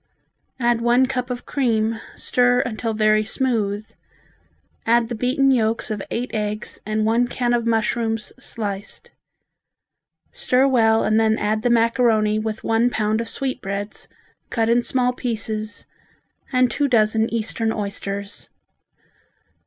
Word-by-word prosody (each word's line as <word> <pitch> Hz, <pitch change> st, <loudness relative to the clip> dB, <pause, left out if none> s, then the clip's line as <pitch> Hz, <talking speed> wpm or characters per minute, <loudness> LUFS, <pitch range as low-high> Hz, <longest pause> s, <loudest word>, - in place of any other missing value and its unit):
Add 240 Hz, -1 st, +2 dB
one 240 Hz, +2 st, +4 dB
cup 255 Hz, -1 st, -3 dB
of 245 Hz, -1 st, -5 dB
cream, 230 Hz, -4 st, 0 dB, 0.2 s
stir 245 Hz, 0 st, +2 dB
until 225 Hz, -1 st, -3 dB
very 215 Hz, 0 st, +3 dB
smooth, 215 Hz, -3 st, -1 dB, 1.0 s
add 230 Hz, 0 st, +2 dB
the -, -, -3 dB
beaten 255 Hz, +4 st, +2 dB
yolks 225 Hz, -2 st, 0 dB
of 210 Hz, -2 st, -3 dB
eight 245 Hz, +2 st, -3 dB
eggs 210 Hz, 0 st, -3 dB
and 215 Hz, 0 st, 0 dB
one 230 Hz, +2 st, +2 dB
can 240 Hz, 0 st, -1 dB
of 235 Hz, -1 st, 0 dB
mushrooms 225 Hz, 0 st, 0 dB
sliced. 205 Hz, -6 st, -6 dB, 1.2 s
Stir 270 Hz, -, +2 dB
well 225 Hz, -4 st, +3 dB
and 215 Hz, +1 st, +3 dB
then 220 Hz, 0 st, +3 dB
add 215 Hz, 0 st, 0 dB
the 245 Hz, -, +1 dB
macaroni 230 Hz, -2 st, +3 dB
with 220 Hz, 0 st, -4 dB
one 225 Hz, +2 st, +2 dB
pound 220 Hz, -1 st, 0 dB
of 230 Hz, -, -5 dB
sweetbreads, 205 Hz, -7 st, -4 dB, 0.4 s
cut 225 Hz, -2 st, 0 dB
in 240 Hz, +1 st, +4 dB
small 250 Hz, 0 st, +1 dB
pieces 220 Hz, -3 st, -4 dB, 0.7 s
and 255 Hz, -2 st, +3 dB
two 290 Hz, -, +1 dB
dozen 220 Hz, -2 st, +2 dB
Eastern 225 Hz, 0 st, -1 dB
oysters. 200 Hz, -1 st, -4 dB
225 Hz, 130 wpm, -22 LUFS, 215-245 Hz, 1.2 s, one